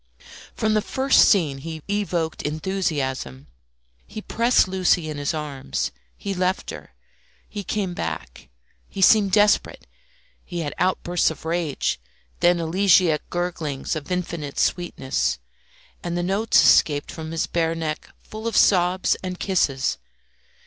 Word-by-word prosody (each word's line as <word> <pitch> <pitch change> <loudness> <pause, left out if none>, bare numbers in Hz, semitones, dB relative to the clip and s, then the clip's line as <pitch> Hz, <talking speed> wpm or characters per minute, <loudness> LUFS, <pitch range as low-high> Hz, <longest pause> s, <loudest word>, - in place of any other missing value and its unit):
From 220 0 +1
the 215 - +2
first 265 +5 +4
scene 155 -9 +2
he 160 +1 -7
evoked 185 -6 -1
enthusiasm. 145 - -3 0.6
He 215 - -7
pressed 235 +1 +2
Lucy 180 -4 +1
in 150 - -6
his 145 - -1
arms, 150 -4 -3 0.3
he 200 - -4
left 185 +1 -1
her, - - -11 0.5
he 205 -1 -6
came 195 -1 -2
back, 75 - -6 0.4
he - - -8
seemed 200 +1 +5
desperate; 210 +1 +2 0.6
he 175 -2 -5
had 145 -2 -3
outbursts 180 -1 +1
of 160 - -9
rage, 165 - -1 0.4
then 175 0 +3
elegiac 170 -2 +3
gurglings 165 -5 -3
of 155 +3 -6
infinite 170 -5 -3
sweetness, 175 -7 0 0.6
and 175 0 -3
the 175 - -1
notes 200 +5 +3
escaped 145 -2 +4
from 160 -1 -7
his 165 0 -1
bare 165 -1 0
neck 155 -2 -4
full 220 +1 -7
of 230 - -1
sobs 180 -1 +3
and 185 -1 -5
kisses. 140 -9 0
175 Hz, 135 wpm, -23 LUFS, 155-190 Hz, 0.6 s, seemed